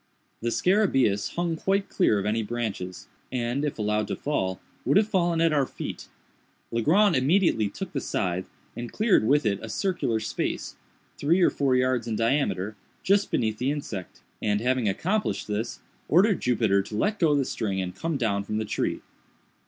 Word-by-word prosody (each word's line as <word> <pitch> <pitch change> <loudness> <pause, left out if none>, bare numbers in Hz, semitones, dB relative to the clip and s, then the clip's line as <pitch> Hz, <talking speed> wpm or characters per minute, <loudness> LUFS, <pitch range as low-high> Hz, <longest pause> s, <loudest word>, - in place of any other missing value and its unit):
The 120 - 0
scarabæus 135 - +2
hung 170 -1 0
quite 195 +4 0
clear 145 - +2
of 100 - -2
any 110 +2 +1
branches, 105 -5 -4 0.2
and, 125 +2 -1
if 150 - -2
allowed 105 0 0
to - - -2
fall, 95 -11 -2 0.2
would 140 - +3
have 210 0 +4
fallen 175 -5 +1
at 165 -2 +3
our 140 -3 +2
feet. - - -7 0.6
Legrand 170 - +3
immediately 135 - +3
took 175 - -6
the 135 - -1
scythe, 90 0 -2 0.3
and 120 0 -6
cleared 215 - +3
with 145 0 +3
it 100 -2 +1
a 115 - -7
circular 145 - 0
space, - - -3 0.4
three 165 +6 +3
or 180 - +5
four 135 -3 +1
yards 125 -2 +1
in 110 - -1
diameter, 110 -5 0 0.3
just 200 +1 +3
beneath 110 -2 0
the 125 +2 0
insect, 130 -11 -5 0.2
and, 105 -1 +1
having 125 -1 +1
accomplished 190 - -1
this, 105 +3 -3 0.3
ordered 195 +5 +4
Jupiter 110 -5 +2
to 105 +2 -6
let 210 - 0
go 155 -4 +4
the 140 -2 +1
string 100 -6 -2
and 90 -1 -3
come 165 -2 -2
down 100 -5 0
from 105 +1 -3
the 110 - -1
tree. - - -2
125 Hz, 175 wpm, -26 LUFS, 105-165 Hz, 0.6 s, or